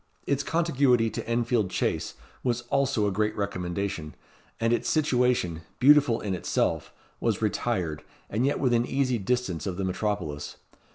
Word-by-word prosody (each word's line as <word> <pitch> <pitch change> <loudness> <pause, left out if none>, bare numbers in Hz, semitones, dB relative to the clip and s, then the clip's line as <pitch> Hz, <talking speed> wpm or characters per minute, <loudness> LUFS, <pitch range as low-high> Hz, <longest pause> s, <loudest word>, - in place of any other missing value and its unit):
Its 140 0 +1
contiguity 140 -8 +2
to - - -5
Enfield 115 -3 +1
Chase - - -1 0.3
was 120 -2 0
also 135 -6 +2
a 100 - +1
great 105 +2 0
recommendation; 95 -4 -3 0.4
and 115 +1 +2
its - - 0
situation, 125 - +1 0.2
beautiful 140 -3 +5
in 100 -2 -2
itself, 90 - -1 0.3
was - - 0
retired, 80 -5 -1 0.3
and 110 +4 -1
yet 140 - +1
within 120 -3 +3
easy 130 -1 0
distance 105 -5 -1
of 90 -2 -3
the 100 - -2
metropolis. 90 -6 -3
115 Hz, 145 wpm, -27 LUFS, 95-125 Hz, 0.4 s, beautiful